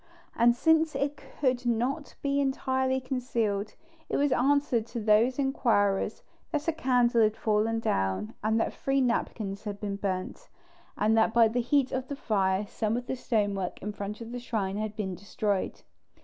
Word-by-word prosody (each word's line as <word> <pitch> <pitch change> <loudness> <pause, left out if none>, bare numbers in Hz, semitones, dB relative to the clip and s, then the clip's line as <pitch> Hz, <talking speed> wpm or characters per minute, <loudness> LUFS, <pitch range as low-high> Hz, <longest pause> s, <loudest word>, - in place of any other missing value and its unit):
And 235 0 +4
since 320 +3 +3
it 280 +1 -1
could 260 -2 -2
not 245 +5 -1
be 280 0 +1
entirely 265 -1 0
concealed, 235 -5 -2 0.3
it - - 0
was 285 -1 +2
answered 260 -3 +2
to 235 - -5
these 220 +4 +3
inquirers 230 -8 +1 0.3
that 300 0 -2
a - - +4
candle 245 -5 +3
had 215 0 +3
fallen 220 +1 +1
down 95 - -1
and 220 +1 +2
that - - 0
three 275 0 0
napkins 220 -5 -1
had 205 -1 -4
been 200 -2 -3
burnt, 185 -2 -4 0.5
and 215 +2 +3
that 220 +1 +2
by 230 -1 +7
the 240 +3 0
heat 265 +2 +2
of 260 0 -2
the 285 - -4
fire 200 -6 0
some 220 +2 -1
of 245 - -4
the 260 - -3
stonework 205 -7 -1
in 210 - -2
front 205 +2 -6
of 230 0 -7
the 245 - -4
shrine 205 -5 -2
had 215 0 -3
been 200 -4 -3
destroyed. 200 +1 -2
230 Hz, 175 wpm, -28 LUFS, 210-260 Hz, 0.5 s, by